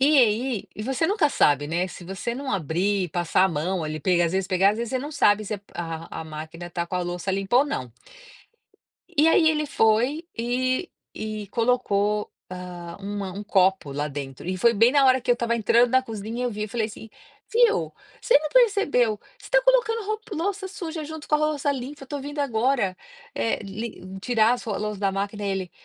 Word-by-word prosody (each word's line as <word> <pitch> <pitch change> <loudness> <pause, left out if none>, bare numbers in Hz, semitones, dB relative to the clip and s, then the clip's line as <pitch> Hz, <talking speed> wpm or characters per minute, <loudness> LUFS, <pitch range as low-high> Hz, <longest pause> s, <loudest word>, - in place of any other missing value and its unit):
E 290 +2 +5
aí 235 -1 +2
e 210 - -6
você 265 +6 0
nunca 385 -6 +2
sabe, 145 - +3
né, 170 +3 0
se 185 - -10
você 195 +6 -4
não 270 +1 -4
abrir, 185 +2 0
passar 175 +2 +2
a - - +3
mão 170 +2 -1
ali, 155 -1 -5 0.2
às 165 - -1
vezes 190 0 -1
pegar 190 +1 +4
às 210 - -3
vezes 235 -1 -3
você 260 - 0
não 290 +4 -6
sabe 210 -6 +3
se 205 -1 -4
a 165 -1 -5
máquina 160 +2 -8
tá 170 0 -2
com 180 - -3
a - - 0
louça 175 +2 -3
limpa 195 +4 +1
ou 275 - +5
não. 130 - -4 1.2
E 325 -3 +3
aí 325 0 +5
ele 305 -1 +1
foi 250 +7 +2
e 255 +7 0 0.2
e 215 -1 -5
colocou, 210 -3 +1 0.2
hã, 180 -2 -7
um 205 +1 -4 0.2
um 205 - -4
copo 190 -6 +2
lá 145 +2 -2
dentro, 140 0 -7
e 185 +1 -1
foi 235 +5 +4
bem 230 +5 +5
na 280 -2 +5
hora 260 0 +5
que 245 - -2
eu - - +8
estava 235 -1 -1
entrando 235 +2 +4
na 260 +1 +4
cozinha 225 +1 -5
eu 245 - 0
vi 210 -1 -3
e - - -7
falei 220 0 -1
assim: 220 +1 -11 0.4
"Viu, 460 -1 +3 0.3
você 470 - +5
não 305 +1 -4
percebeu, 405 - +3 0.3
você - - -13
está - - +3
colocando - - +3
ro 430 +1 -2 0.2
louça 385 +4 -2
suja 335 -5 -5
junto 315 0 -8
com - - +3
a - - -3
louça 300 -2 0
limpa, 275 +2 -6
eu - - -6
estou 285 +2 -5
vindo 290 +2 -5
agora, 240 -6 +1 0.4
eh, 115 -1 0
li 210 +3 -6 0.2
tirar 225 +1 +3
as 250 - -7
ro 215 -4 -2
as 195 - -3
louça 210 -2 -3
da 200 -1 +2
máquina", 200 +1 -3
ele: 190 -2 -2
220 Hz, 210 wpm, -25 LUFS, 190-275 Hz, 1.2 s, eu